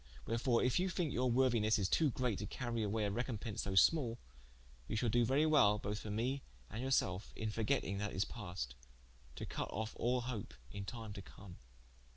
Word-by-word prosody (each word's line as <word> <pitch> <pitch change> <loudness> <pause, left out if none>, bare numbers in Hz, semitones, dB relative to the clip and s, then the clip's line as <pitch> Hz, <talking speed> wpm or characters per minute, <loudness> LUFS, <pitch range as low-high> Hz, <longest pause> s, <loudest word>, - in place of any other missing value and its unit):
Wherefore 115 +1 +2
if 125 +4 +3
you 185 +1 +1
thinke 170 -5 -1
your 125 +1 +2
worthinesse 115 -5 +3
to 155 +7 +3
great 125 -4 -1
to 105 - -3
cary 120 -3 -3
away 105 +1 0
a 100 - 0
recompence 115 -1 -3
so 95 -1 -2
small, 120 - +4 0.7
you - - -2
shall 115 +2 +1
doe 120 +2 +4
very 135 +6 +3
wel 135 -10 +5
both 105 +1 -3
for 110 - -7
me 125 +6 -1 0.3
and 110 +3 -4
yourselfe, 110 -7 +1
in 110 -1 -2
forgetting 105 -2 0
that 105 0 -2
is 95 - +1
past, 90 - -5 0.6
to - - -5
cut - - -4
of 110 +2 -3
all 125 +1 +1
hope 115 - -5 0.2
in 100 -1 -5
time 110 -1 -6
to 100 - -7
come." 95 -1 -12
115 Hz, 190 wpm, -37 LUFS, 105-125 Hz, 0.7 s, wel